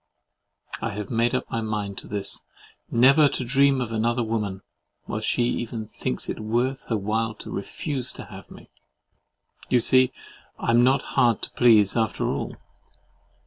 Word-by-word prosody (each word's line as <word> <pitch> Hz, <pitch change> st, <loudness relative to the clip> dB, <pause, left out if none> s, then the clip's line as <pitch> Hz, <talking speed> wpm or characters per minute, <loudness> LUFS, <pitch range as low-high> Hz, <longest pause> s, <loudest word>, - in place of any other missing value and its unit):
I 115 Hz, -, -2 dB
have 105 Hz, 0 st, -6 dB
made 115 Hz, +1 st, +2 dB
up -, -, -2 dB
my 115 Hz, -, -1 dB
mind 105 Hz, -3 st, -3 dB
to -, -, -9 dB
this, 100 Hz, -1 st, -3 dB, 0.5 s
never 135 Hz, +5 st, +6 dB
to 130 Hz, -, -3 dB
dream 135 Hz, +2 st, +4 dB
of 120 Hz, -2 st, -3 dB
another 120 Hz, +2 st, 0 dB
woman, 105 Hz, -4 st, -3 dB, 0.4 s
while 110 Hz, -, -4 dB
she 120 Hz, +2 st, +1 dB
even 120 Hz, -2 st, -2 dB
thinks 65 Hz, -10 st, -3 dB
it -, -, -4 dB
worth 120 Hz, +5 st, -1 dB
her 115 Hz, -, -1 dB
while 110 Hz, +2 st, -1 dB
to -, -, -9 dB
REFUSE 130 Hz, +5 st, -3 dB
TO -, -, -9 dB
HAVE 95 Hz, -2 st, -12 dB
ME. -, -, -14 dB, 1.0 s
You 125 Hz, -, +4 dB
see 130 Hz, +2 st, +4 dB, 0.5 s
I -, -, 0 dB
am 120 Hz, +1 st, +5 dB
not 130 Hz, +2 st, +3 dB
hard 120 Hz, -3 st, +3 dB
to -, -, -5 dB
please, 110 Hz, -5 st, +4 dB
after 110 Hz, -2 st, 0 dB
all. -, -, -3 dB
115 Hz, 165 wpm, -25 LUFS, 110-125 Hz, 1.0 s, never